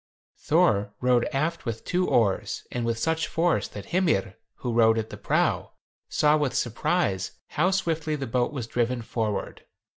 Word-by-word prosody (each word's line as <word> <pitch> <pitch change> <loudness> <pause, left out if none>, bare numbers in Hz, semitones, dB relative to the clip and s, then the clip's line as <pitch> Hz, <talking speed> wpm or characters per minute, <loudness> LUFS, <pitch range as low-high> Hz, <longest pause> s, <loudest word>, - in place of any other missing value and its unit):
Thor 100 +1 +2
rowed 125 -1 +3
aft 155 +5 -1
with 115 -1 -4
two 180 +1 +1
oars, 105 -5 +1
and 120 - -2
with 115 -1 0
such 160 +5 0
force 170 +1 +1
that 100 - -9
Hymir, 160 - +2 0.2
who 120 -2 -4
rowed 115 -1 +5
at 110 -1 -3
the - - -6
prow, - - 0 0.4
saw 150 0 +3
with 145 -4 -1
surprise, 115 - 0 0.2
how 175 +5 +2
swiftly 165 -5 0
the 140 -2 -4
boat 120 +2 0
was 135 -6 -4
driven 120 +1 -1
forward. 110 -3 -3
125 Hz, 160 wpm, -26 LUFS, 110-160 Hz, 0.4 s, rowed